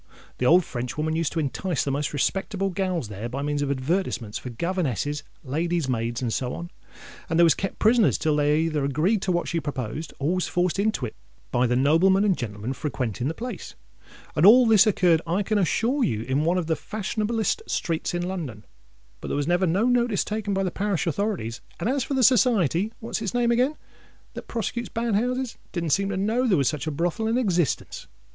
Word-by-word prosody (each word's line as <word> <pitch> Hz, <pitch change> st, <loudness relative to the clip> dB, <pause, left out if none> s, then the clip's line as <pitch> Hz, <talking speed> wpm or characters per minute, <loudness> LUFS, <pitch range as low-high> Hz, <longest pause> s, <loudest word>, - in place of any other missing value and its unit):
The 125 Hz, -, +2 dB
old 175 Hz, +4 st, +6 dB
Frenchwoman 150 Hz, +6 st, -3 dB
used 165 Hz, -2 st, 0 dB
to 165 Hz, -, -1 dB
entice 160 Hz, +2 st, -1 dB
the 140 Hz, -, -1 dB
most 145 Hz, +2 st, -1 dB
respectable 195 Hz, +6 st, -1 dB
gals 185 Hz, -, -2 dB
there 105 Hz, +3 st, -5 dB
by 135 Hz, +3 st, -4 dB
means 145 Hz, 0 st, -1 dB
of 145 Hz, -, -1 dB
advertisements 130 Hz, -, -1 dB
for 125 Hz, -, -7 dB
governesses, 145 Hz, -, -2 dB, 0.2 s
ladies 165 Hz, +3 st, -1 dB
maids, 120 Hz, 0 st, -2 dB
and 115 Hz, -2 st, -1 dB
so 125 Hz, -1 st, -2 dB
on; 170 Hz, +1 st, -7 dB, 0.6 s
and 165 Hz, -, +1 dB
they -, -, +7 dB
was 165 Hz, -, +6 dB
kept 195 Hz, -, -4 dB
prisoners 225 Hz, 0 st, +4 dB
till 155 Hz, -2 st, +1 dB
they 150 Hz, +1 st, +2 dB
either 155 Hz, -3 st, 0 dB
agreed 155 Hz, -, +1 dB
to 190 Hz, -, 0 dB
what 175 Hz, -1 st, 0 dB
she 170 Hz, -, -1 dB
proposed, 145 Hz, 0 st, -4 dB
or 145 Hz, +5 st, 0 dB
was 185 Hz, -1 st, 0 dB
forced 180 Hz, +1 st, 0 dB
into 210 Hz, -10 st, 0 dB
it 110 Hz, -, -7 dB, 0.4 s
by 125 Hz, +1 st, +2 dB
the 125 Hz, -, +1 dB
noblemen 165 Hz, +9 st, +4 dB
and 200 Hz, -3 st, +3 dB
gentlemen 110 Hz, -1 st, -4 dB
frequenting 125 Hz, -4 st, -3 dB
the 160 Hz, -, -2 dB
place. 240 Hz, -3 st, -7 dB, 0.6 s
And 150 Hz, -, +2 dB
all 240 Hz, +6 st, +8 dB
this 220 Hz, -2 st, +6 dB
occurred, 175 Hz, -5 st, +3 dB
I 180 Hz, +5 st, +1 dB
can 210 Hz, +1 st, +1 dB
assure 235 Hz, -, +1 dB
you, 110 Hz, -, 0 dB
in 135 Hz, +5 st, 0 dB
one 175 Hz, +2 st, +2 dB
of 180 Hz, -, -1 dB
the 160 Hz, 0 st, 0 dB
fashion 215 Hz, +3 st, -4 dB
ablest 225 Hz, -, 0 dB
streets 165 Hz, 0 st, -2 dB
in 175 Hz, 0 st, -2 dB
London. 145 Hz, -, -5 dB, 0.5 s
But -, -, -7 dB
there -, -, -1 dB
was 145 Hz, -, 0 dB
never 175 Hz, +3 st, +2 dB
no 190 Hz, +7 st, +2 dB
notice 245 Hz, -4 st, +2 dB
taken 210 Hz, -2 st, -2 dB
by 195 Hz, -, +1 dB
the 185 Hz, -, -1 dB
parish 195 Hz, -3 st, -1 dB
authorities; 170 Hz, -, -2 dB, 0.2 s
and -, -, -1 dB
as 265 Hz, +1 st, +1 dB
for 275 Hz, -, -3 dB
the 260 Hz, -, +2 dB
Society—what's 220 Hz, -, +2 dB
its 220 Hz, +1 st, -3 dB
name 240 Hz, -1 st, +2 dB
again?—that 255 Hz, +6 st, -4 dB
prosecutes 235 Hz, +1 st, -3 dB
bad 230 Hz, -1 st, -2 dB
houses, 250 Hz, +4 st, -1 dB
it -, -, -34 dB
didn't 170 Hz, -3 st, -2 dB
seem 195 Hz, +6 st, +2 dB
to 195 Hz, -, -2 dB
know 225 Hz, +6 st, +1 dB
there 195 Hz, -6 st, +3 dB
was 140 Hz, -3 st, +2 dB
such 150 Hz, 0 st, -4 dB
a -, -, 0 dB
brothel 175 Hz, +8 st, -1 dB
in 230 Hz, +2 st, +1 dB
existence. 180 Hz, -, -1 dB
175 Hz, 210 wpm, -25 LUFS, 145-210 Hz, 0.6 s, all